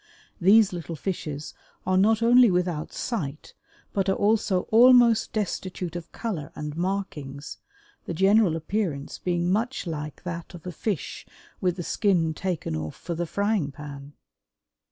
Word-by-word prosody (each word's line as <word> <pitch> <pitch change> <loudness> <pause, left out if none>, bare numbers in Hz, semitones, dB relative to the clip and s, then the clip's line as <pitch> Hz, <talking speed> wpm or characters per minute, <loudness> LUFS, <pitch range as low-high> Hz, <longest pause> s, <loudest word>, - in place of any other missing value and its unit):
These 200 +2 +5
little 170 -1 -5
fishes 155 -4 -4 0.3
are 185 - +2
not 220 +4 +4
only 240 0 +7
without 180 -4 -1
sight 155 - -4 0.4
but 195 -1 +1
are 190 - +3
also 205 -3 +2
almost 235 -1 +6
destitute 185 -4 -3
of 175 -2 -7
color 190 -11 -4
and 150 0 -5
markings, 160 -7 -4 0.5
the - - -4
general 195 0 +4
appearance 165 -4 -3
being 175 0 0
much 230 +6 -1
like 150 -3 -5
that 170 0 -6
of 170 - -12
a 180 - -4
fish 190 - -4 0.3
with 180 -2 +1
the 175 - -5
skin 170 -5 +1
taken 175 - -3
off 80 0 -4
for 170 - -5
the 170 +1 -3
frying 200 -6 0
pan. 140 0 -9
180 Hz, 145 wpm, -26 LUFS, 155-205 Hz, 0.5 s, only